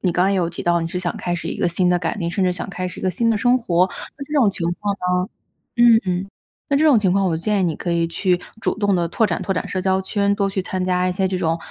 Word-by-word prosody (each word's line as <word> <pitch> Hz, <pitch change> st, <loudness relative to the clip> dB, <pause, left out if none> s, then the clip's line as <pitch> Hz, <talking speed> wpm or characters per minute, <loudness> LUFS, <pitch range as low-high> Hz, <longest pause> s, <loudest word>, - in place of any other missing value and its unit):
你 180 Hz, -, +1 dB
刚 180 Hz, +2 st, +2 dB
刚 195 Hz, -, +2 dB
也 195 Hz, -, +1 dB
有 170 Hz, -2 st, 0 dB
提 175 Hz, -, -6 dB
到， 175 Hz, 0 st, +2 dB
你 165 Hz, -, -3 dB
是 180 Hz, -, -3 dB
想 175 Hz, -2 st, -3 dB
开 175 Hz, -1 st, -2 dB
始 170 Hz, -, -5 dB
一 -, -, -4 dB
个 -, -, +1 dB
新 180 Hz, +2 st, +1 dB
的 180 Hz, 0 st, +3 dB
改 165 Hz, -1 st, -2 dB
变， 170 Hz, -5 st, -2 dB
甚 190 Hz, +3 st, -1 dB
至 180 Hz, -, +2 dB
想 180 Hz, -, -6 dB
开 185 Hz, -1 st, -4 dB
始 -, -, -10 dB
一 -, -, -8 dB
个 185 Hz, -, +1 dB
新 230 Hz, +5 st, +1 dB
的 220 Hz, -, +2 dB
生 245 Hz, +4 st, +3 dB
活， 185 Hz, -6 st, +2 dB, 0.3 s
那 280 Hz, -, -6 dB
这 300 Hz, -, -11 dB
种 245 Hz, -8 st, +4 dB
情 180 Hz, -3 st, -3 dB
况 205 Hz, -1 st, 0 dB
呢 -, -, -22 dB, 0.8 s
嗯 235 Hz, -2 st, +7 dB
嗯， 185 Hz, +1 st, -1 dB, 0.4 s
那 280 Hz, -, +3 dB
这 310 Hz, -, +3 dB
种 280 Hz, -7 st, +6 dB
情 190 Hz, -3 st, +2 dB
况， 195 Hz, 0 st, +2 dB
我 165 Hz, -3 st, 0 dB
建 205 Hz, +4 st, 0 dB
议 -, -, +1 dB
你 165 Hz, -3 st, 0 dB
可 175 Hz, -, -3 dB
以 170 Hz, 0 st, +1 dB
去 180 Hz, +2 st, 0 dB, 0.2 s
主 -, -, -1 dB
动 205 Hz, -2 st, +2 dB
地 170 Hz, -1 st, 0 dB
拓 220 Hz, +7 st, +1 dB
展 175 Hz, -5 st, -2 dB
拓 195 Hz, -, -1 dB
展 -, -, -3 dB
社 185 Hz, -, -3 dB
交 190 Hz, 0 st, +1 dB
圈， 200 Hz, +1 st, 0 dB
多 200 Hz, -1 st, 0 dB
去 190 Hz, -1 st, -2 dB
参 185 Hz, 0 st, -3 dB
加 180 Hz, 0 st, +1 dB
一 185 Hz, -, 0 dB
些 190 Hz, +1 st, 0 dB
这 185 Hz, 0 st, -2 dB
种 165 Hz, -1 st, 0 dB
185 Hz, 345 characters per minute, -21 LUFS, 175-200 Hz, 0.8 s, 嗯